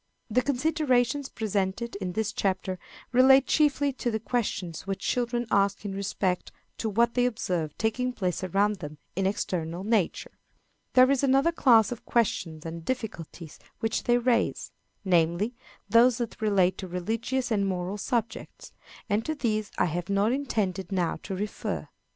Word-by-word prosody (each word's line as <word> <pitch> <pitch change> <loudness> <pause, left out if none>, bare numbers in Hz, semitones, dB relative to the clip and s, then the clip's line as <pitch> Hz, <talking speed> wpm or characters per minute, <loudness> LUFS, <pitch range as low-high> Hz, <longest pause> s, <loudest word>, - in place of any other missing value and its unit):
_ - - -5
The 250 - +4
considerations 275 -1 +1
presented 210 +1 -2
in 185 -3 -4
this 220 +2 -1
chapter 185 -1 -1 0.3
relate 265 +2 +6
chiefly 285 -2 +2
to 250 - -2
the 220 -1 -1
questions 200 -7 -3
which 195 0 -3
children 240 -1 0
ask 200 +1 +2
in 200 - -3
respect 195 -2 -2 0.3
to 225 - -1
what 235 +3 +2
they 245 0 +3
observe 175 -9 -2
taking 250 +3 0
place 185 -7 -2
around 200 +3 +1
them 150 -3 -8 0.2
in 190 +1 +1
external 175 -3 -2
nature. 210 -4 0 0.6
There 255 +1 +6
is 275 - +2
another 275 +4 +3
class 235 -9 +5
of 240 - -6
questions 170 -9 -1
and 165 0 -6
difficulties 170 - -5 0.2
which 225 0 -1
they 240 0 +4
raise 240 -1 0 0.3
namely, 175 +5 +2 0.3
those 235 +1 +5
that 235 -2 -5
relate 195 -4 +2
to 190 - -5
religious 225 +8 -2
and 200 -2 +2
moral 185 +2 -3
subjects; 230 0 -3 0.4
and 215 0 +1
to 315 - -2
these 215 -6 -1
I - - +3
have 175 +2 -3
not 200 +3 +2
intended 205 -9 -2
now 180 -3 0
to 190 - -5
refer. 205 +2 -4
215 Hz, 155 wpm, -27 LUFS, 185-245 Hz, 0.6 s, relate